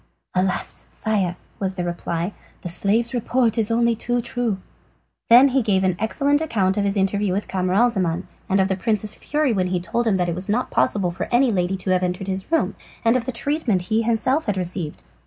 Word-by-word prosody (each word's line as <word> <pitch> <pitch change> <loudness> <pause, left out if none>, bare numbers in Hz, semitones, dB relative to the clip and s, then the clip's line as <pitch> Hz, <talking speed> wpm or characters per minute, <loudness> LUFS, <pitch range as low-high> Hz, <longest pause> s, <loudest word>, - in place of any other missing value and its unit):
"Alas, 185 0 -1
sire," 200 -5 -1 0.2
was 190 -1 -2
the 180 - -2
reply, 175 +1 -3 0.3
"the - - -4
slave's 215 +7 +1
report 240 -1 +1
is 225 -2 +2
only 235 +1 +3
too 240 +2 -1
true!" 240 -1 -1 0.8
He 230 - +8
then 265 +1 +6
gave 195 -4 +1
an 185 -2 +2
exact 280 +7 +1
account 200 -11 +1
of 205 - 0
his 200 0 +1
interview 200 0 +1
with 200 +2 -2
Camaralzaman 185 -2 +1 0.3
and 195 0 +3
of 190 - +3
the 190 - 0
prince's 215 +1 -1
fury 295 -4 0
when 185 -2 0
told 235 +7 -1
that 190 -4 +2
it 170 - -1
was 185 +4 -4
not 235 +5 0
possible 190 -4 +1
for 170 - -4
any 245 +1 +4
lady 185 -1 0
to 185 0 -2
have 185 0 +3
entered 180 +1 -2
his 190 - -4
room, 325 - +2 0.3
and 230 +2 +4
of 245 -2 0
the 260 - -2
treatment 240 - 0
he 225 - +3
himself 235 +6 +1
had 205 -2 0
received. 175 -3 -3
205 Hz, 200 wpm, -22 LUFS, 185-235 Hz, 0.8 s, He